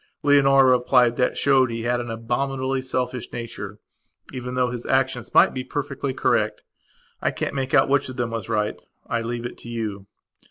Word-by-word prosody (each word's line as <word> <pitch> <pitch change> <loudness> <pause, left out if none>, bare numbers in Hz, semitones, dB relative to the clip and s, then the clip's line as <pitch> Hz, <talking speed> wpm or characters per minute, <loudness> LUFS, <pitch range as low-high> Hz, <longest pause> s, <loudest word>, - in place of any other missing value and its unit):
Leonora 135 -2 +5
replied 125 -1 +3
that 125 0 0
showed 135 -2 +4
he 115 -1 -4
had 120 +1 +1
an 120 - -6
abominably 130 +3 -2
selfish 130 -1 -3
nature 105 -4 -6 0.6
even 125 0 -5
though 125 -1 +1
his 120 -1 -5
actions 130 -3 0
might - - +6
be 130 - -3
perfectly 140 0 -3
correct. - - 0 0.6
I - - +2
can't - - -3
make 135 -1 -1
out - - +5
which 140 -1 +1
of 130 - -7
them 120 -2 -1
was 115 -4 -5
right. 105 0 -1 0.2
I 115 - -1
leave 120 +1 -4
it 120 - -7
to 120 - -10
you. 105 -4 -4
125 Hz, 185 wpm, -23 LUFS, 115-135 Hz, 0.6 s, might